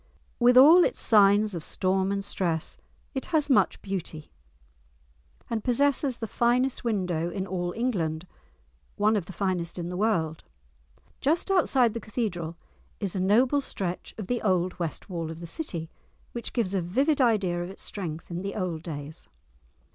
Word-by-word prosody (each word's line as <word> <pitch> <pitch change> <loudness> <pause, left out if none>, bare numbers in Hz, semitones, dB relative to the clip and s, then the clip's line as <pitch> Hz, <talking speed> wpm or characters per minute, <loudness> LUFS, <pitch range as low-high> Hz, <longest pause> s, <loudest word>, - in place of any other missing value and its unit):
With 245 +1 +5
all 320 +7 +9
its - - -1
signs 205 -1 +4
of 170 -3 -5
storm 190 +3 0
and 200 0 -2
stress 170 -5 -2 0.3
it 265 - -4
has 300 -4 +1
much 260 - +3
beauty, 175 -5 -5 1.2
and 225 -2 -2
possesses 270 0 +1
the 225 - -4
finest 240 +4 +1
window 180 -7 -1
in 190 +1 -3
all 175 -2 -2
England, 175 -9 -1 0.7
one 215 +2 +3
of 190 -5 -2
the - - -7
finest 185 -3 -2
in 175 -1 -4
the 180 - -5
world. 175 -6 0 0.8
Just 330 +7 +1
outside 265 - +3
the 230 - -3
Cathedral 180 -8 -3 0.4
is 200 -3 -3
a - - -1
noble 245 +9 +3
stretch 185 -8 -5
of 215 - -5
the 245 +3 -1
old 185 -3 0
West 165 -3 -4
Wall 170 -4 -4
of 160 0 -7
the 170 - -7
city, 170 - -5 0.4
which 235 - -6
gives 215 -6 -1
a 190 - +1
vivid 270 - +1
idea 200 -8 +2
of 175 - -5
its 195 - -10
strength 165 -4 -6
in 170 +1 -3
the 200 +1 -4
old 180 -5 -2
days. 155 -2 -7
195 Hz, 165 wpm, -27 LUFS, 175-240 Hz, 1.2 s, all